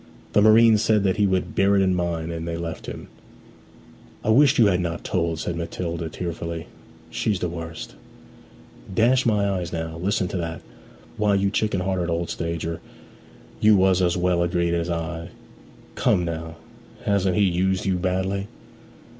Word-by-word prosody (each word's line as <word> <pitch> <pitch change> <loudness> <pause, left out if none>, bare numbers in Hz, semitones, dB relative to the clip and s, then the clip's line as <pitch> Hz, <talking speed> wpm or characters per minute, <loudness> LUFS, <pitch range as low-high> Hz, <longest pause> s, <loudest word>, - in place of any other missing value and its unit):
The 105 - +5
marine 110 +1 +6
said 105 -1 +2
that 95 0 +1
he 105 -1 +3
would 95 -1 -1
bear 100 +1 +3
it 100 - +4
in 95 -1 +2
mind, 85 -2 -2
and 85 0 -5
they 85 0 -3
left 85 -1 -6
him. - - -7 1.2
'I - - -1
wish 135 +5 +5
you 115 - +6
had 90 -3 +3
not 85 -1 -3
told,' 85 -2 -1
said 85 +2 -3
Matilda 85 0 -4
tearfully. 85 -1 -5 0.5
'She's 105 -4 -1
the 90 - -1
worst!' 80 -1 -7 1.0
'Dash 120 +6 +3
my 105 -3 +2
eyes 90 -4 -2
now; 80 -1 -4
listen 95 0 0
to - - -3
that! 85 -1 -4 0.5
Why, 105 -1 +2
you 100 0 +1
chicken 100 -2 0
hearted 90 -2 -1
old 85 0 -2
stager, 85 0 -3 0.8
you 105 0 +6
was 95 -1 +3
as 90 0 +2
well 90 -1 +1
agreed 85 -1 0
as 85 0 -1
I. 85 0 -4 0.6
Come 90 - +2
now; 80 -1 -5 0.5
hasn't 95 -2 +1
he 105 - +4
used 95 0 +1
you 95 -2 +1
badly?' 95 +2 -1
90 Hz, 165 wpm, -23 LUFS, 85-100 Hz, 1.2 s, marine